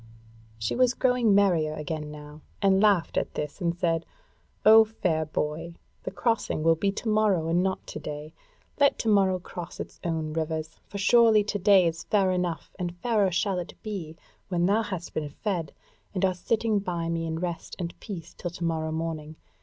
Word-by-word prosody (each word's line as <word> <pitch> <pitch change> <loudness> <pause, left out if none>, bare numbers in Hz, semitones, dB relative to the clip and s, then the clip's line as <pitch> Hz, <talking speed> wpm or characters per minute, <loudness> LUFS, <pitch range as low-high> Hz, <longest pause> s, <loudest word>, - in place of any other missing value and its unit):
She 110 -1 -2
was 250 -1 +3
growing 250 -5 +3
merrier 170 -6 +3
again 150 0 -4
now, 150 0 -10 0.2
and 195 -1 +4
laughed 200 -5 +3
at - - -1
this 150 +5 -4
and 170 -1 0
said: 165 -2 +1 0.6
"O 220 +1 +9
fair 180 -8 -1
boy! 155 +2 -3 0.3
the - - -4
crossing 225 -9 -1
will 165 0 +5
be 195 +5 0
to 225 - -5
morrow 210 -6 +2
and 170 +2 +2
not 190 0 -1
to - - -7
day; 150 +1 -7 0.5
let 280 -1 +4
to - - -3
morrow 195 -3 +4
cross 175 -1 -8
its - - -7
own 160 -2 -2
rivers; 160 0 -3
for 200 - -7
surely 220 +1 +5
to 205 0 -2
day 190 -1 +6
is 165 -1 -1
fair 195 -3 +2
enough, 180 -2 -2
and 175 -1 -3
fairer 215 -2 +2
shall 185 +1 0
it 175 - -7
be 175 -7 -5 0.3
when 175 -2 +1
thou 205 +4 +3
hast 185 -5 -5
been 150 -2 -2
fed 170 -1 -3 0.4
and 190 +1 +2
art 185 -1 0
sitting 220 +2 +1
by 175 -4 -3
me 165 0 -1
in 160 0 -2
rest 175 -1 -4
and 175 -2 -4
peace 175 -6 -8
till 175 - -5
to 175 0 -8
morrow 160 -1 -1
morning. 160 -1 -4
175 Hz, 190 wpm, -27 LUFS, 160-200 Hz, 0.6 s, O